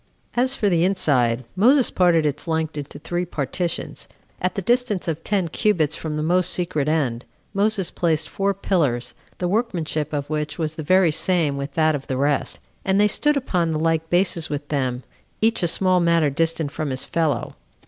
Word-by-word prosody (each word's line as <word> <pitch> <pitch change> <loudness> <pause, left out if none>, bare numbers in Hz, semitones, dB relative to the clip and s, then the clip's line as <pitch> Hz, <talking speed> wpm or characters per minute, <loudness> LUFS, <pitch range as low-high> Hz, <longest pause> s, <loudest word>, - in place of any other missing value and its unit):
4. 245 - +2
As 260 +1 +1
for 210 - 0
the 170 -3 +3
inside, 130 -11 +2
Moses 250 +7 +4
parted 175 -4 +3
its 150 +3 -2
length 160 -1 -1
into 145 -1 -6
three 175 +4 -3
partitions. 170 +1 -3 0.3
At 185 - -1
the 195 - -3
distance 240 -4 0
of 165 0 -3
ten 195 -4 0
cubits 160 -4 +1
from 155 -2 -4
the 150 - -1
most 180 +2 +2
secret 155 -5 -1
end, 130 -7 0 0.3
Moses 200 -2 0
placed 160 -3 0
four 200 -1 -1
pillars, 135 - 0 0.2
the 180 - -1
workmanship 175 -8 -1
of 145 -2 -3
which 150 0 -3
was 160 -2 -2
the 160 - -6
very 185 +2 +4
same 160 -3 +1
with 140 0 -5
that 155 0 +3
of 140 -2 -5
the 130 - -2
rest; 140 +1 0 0.3
and 195 +1 +2
they 210 - +5
stood 295 +7 +2
upon 175 -11 0
the 155 - -1
like 160 0 0
bases 175 -2 +2
with 145 0 -5
them, 130 -3 -1 0.4
each 225 0 +2
a 175 - +2
small 185 +2 +2
matter 170 -4 +3
distant 160 0 0
from 155 0 -3
his 130 -1 -1
fellow. 155 -7 -1
165 Hz, 190 wpm, -22 LUFS, 150-185 Hz, 0.4 s, they